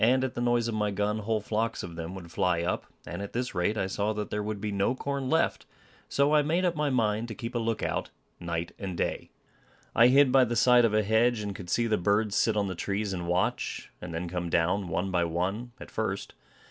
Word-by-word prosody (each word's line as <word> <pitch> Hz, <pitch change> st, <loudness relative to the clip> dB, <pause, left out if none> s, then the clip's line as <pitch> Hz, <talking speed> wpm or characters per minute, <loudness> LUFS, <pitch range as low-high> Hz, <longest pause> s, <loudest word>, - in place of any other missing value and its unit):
At 130 Hz, +2 st, +3 dB
the -, -, -3 dB
noise 120 Hz, -1 st, +2 dB
of 115 Hz, -, -2 dB
my 105 Hz, -1 st, 0 dB
gun, 105 Hz, +2 st, -1 dB
whole 110 Hz, 0 st, -1 dB
flocks 110 Hz, +2 st, -1 dB
of 85 Hz, -1 st, -7 dB
them 85 Hz, +2 st, -5 dB
would 85 Hz, -3 st, -9 dB
fly 85 Hz, -1 st, +1 dB
up; -, -, -2 dB, 0.2 s
and 85 Hz, +3 st, -5 dB
at 100 Hz, -, -6 dB
this 125 Hz, +1 st, -2 dB
rate 95 Hz, +4 st, 0 dB
I 100 Hz, -, +1 dB
saw 100 Hz, +3 st, -1 dB
that 105 Hz, -1 st, -4 dB
there 105 Hz, -, -1 dB
would 105 Hz, 0 st, -3 dB
be 105 Hz, 0 st, -3 dB
no 100 Hz, +5 st, +1 dB
corn 140 Hz, -1 st, -3 dB
left; 160 Hz, -, +1 dB, 0.4 s
so 140 Hz, +2 st, +2 dB
I 150 Hz, -, +6 dB
made 165 Hz, +5 st, +1 dB
up 175 Hz, -1 st, +1 dB
my 150 Hz, -1 st, +1 dB
mind 115 Hz, -3 st, +1 dB
to 110 Hz, -, -6 dB
keep 115 Hz, -1 st, -6 dB
a 120 Hz, -, 0 dB
look 115 Hz, -1 st, -1 dB
out -, -, -1 dB, 0.3 s
night 85 Hz, -1 st, -3 dB
and 95 Hz, -3 st, -4 dB
day. -, -, -2 dB, 0.6 s
I 115 Hz, -, +7 dB
hid 135 Hz, +1 st, +5 dB
by 130 Hz, -1 st, +6 dB
the 120 Hz, 0 st, -2 dB
side 120 Hz, +1 st, +6 dB
of 110 Hz, -, +1 dB
a 110 Hz, -, +3 dB
hedge, 110 Hz, +2 st, +3 dB
and 100 Hz, -1 st, -4 dB
could 90 Hz, -2 st, -8 dB
see 120 Hz, -, +2 dB
the 110 Hz, -3 st, +1 dB
birds 105 Hz, +3 st, +1 dB
sit 110 Hz, -2 st, +2 dB
on 100 Hz, -1 st, +1 dB
the 95 Hz, -, -3 dB
trees 100 Hz, +3 st, -2 dB
and 90 Hz, -2 st, -4 dB
watch, 90 Hz, +1 st, -1 dB
and 90 Hz, -, -6 dB
then 85 Hz, +2 st, -3 dB
come 90 Hz, 0 st, -3 dB
down, 90 Hz, +4 st, +1 dB
one 90 Hz, +3 st, -1 dB
by 90 Hz, -2 st, +2 dB
one, 95 Hz, +8 st, -2 dB
at -, -, -10 dB
first. -, -, -3 dB
105 Hz, 245 wpm, -28 LUFS, 95-120 Hz, 0.6 s, I